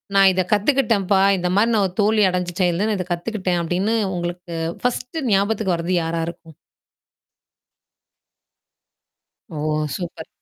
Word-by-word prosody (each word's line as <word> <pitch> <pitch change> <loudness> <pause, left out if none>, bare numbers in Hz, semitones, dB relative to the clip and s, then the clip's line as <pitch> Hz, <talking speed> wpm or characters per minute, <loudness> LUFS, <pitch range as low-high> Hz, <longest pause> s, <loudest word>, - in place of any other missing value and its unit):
நான் 195 -1 +7
இத 185 - +1
கத்துக்கிட்டம்ப்பா. 210 -4 +2 0.2
இந்த 180 0 -1
மாரி 225 +2 +3
ஒரு 180 - -4
தோல்வி 215 0 +3
அடைஞ்சுட்டேன் 180 0 -1
தான், 215 0 +1
இதக் 180 -1 -5
கத்துக்கிட்டேன் 180 -1 -2
அப்படின்னு 185 +7 0 0.2
உங்களுக்கு 175 0 -5 0.3
1 250 +5 -2
ஞாபகத்துக்கு 200 -1 +1
வரது 170 +2 -2
யாரா 165 0 -2
இருக்கும்? 165 -2 -10 3.0
ஓ, 155 - -6 0.4
சூப்பர். 170 -2 -7
185 Hz, 115 wpm, -21 LUFS, 175-210 Hz, 3.0 s, நான்